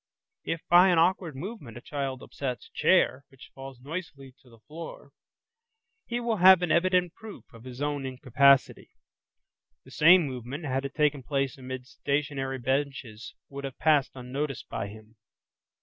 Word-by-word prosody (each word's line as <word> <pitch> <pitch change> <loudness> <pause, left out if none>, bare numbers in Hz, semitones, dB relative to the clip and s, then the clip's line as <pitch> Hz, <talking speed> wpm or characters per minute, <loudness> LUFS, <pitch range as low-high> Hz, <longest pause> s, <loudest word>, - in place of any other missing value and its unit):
If 165 - -4
by 180 +2 +7
an 175 - +3
awkward 170 -2 +1
movement 145 - -8
a - - -10
child 135 -2 -4
upsets 130 -3 -5
a - - -29
chair, 140 -7 +3
which 135 - -16
falls 135 -2 -10
noisily 140 -2 -8
to 125 - -21
the 115 - -18
floor, 160 +6 -10 1.0
he 240 0 -2
will 235 -2 -1
have 185 0 +7
an 175 - 0
evident 180 0 +2
proof 220 -2 -11
of 115 +1 -14
his 130 +2 -6
own 145 -1 -2
incapacity; 135 +1 +2 1.0
the - - -15
same 170 +2 +6
movement 130 +4 -6
had 135 0 -2
it 135 - -6
taken 150 -2 +1
place 135 0 -2
amid 130 -1 -7
stationary 140 -2 -2
benches 130 -4 -3
would 140 0 -8
have 135 -2 -6
passed 150 -4 +2
unnoticed 135 +2 -5
by 100 - -4
him. 110 +2 -14
140 Hz, 160 wpm, -27 LUFS, 130-165 Hz, 1.0 s, by